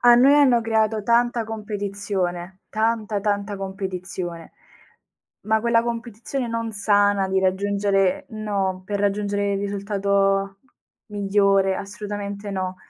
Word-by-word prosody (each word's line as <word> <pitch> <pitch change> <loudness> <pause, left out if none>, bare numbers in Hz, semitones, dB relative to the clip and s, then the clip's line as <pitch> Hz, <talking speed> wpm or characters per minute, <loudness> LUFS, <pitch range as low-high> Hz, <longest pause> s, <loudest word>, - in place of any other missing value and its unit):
A 240 0 +7
noi 270 +4 +6
hanno 260 -5 +5
creato 220 -1 +1
tanta 235 +1 +2
competizione. 200 -4 -4
Tanta, 220 -2 0
tanta 205 0 -1
competizione. 185 -3 -5 0.9
Ma 220 0 +3
quella 230 0 +3
competizione 235 +2 -4
non 230 -1 -3
sana 205 -1 +2
di 190 - +1
raggiungere 200 +6 +1
no, 200 -4 -2
per 205 +1 -3
raggiungere 200 0 0
il - - -1
risultato 200 -1 0 0.5
migliore, 200 -2 +2
assolutamente 205 0 -5
no. 185 -1 -3
205 Hz, 110 wpm, -23 LUFS, 195-220 Hz, 0.9 s, A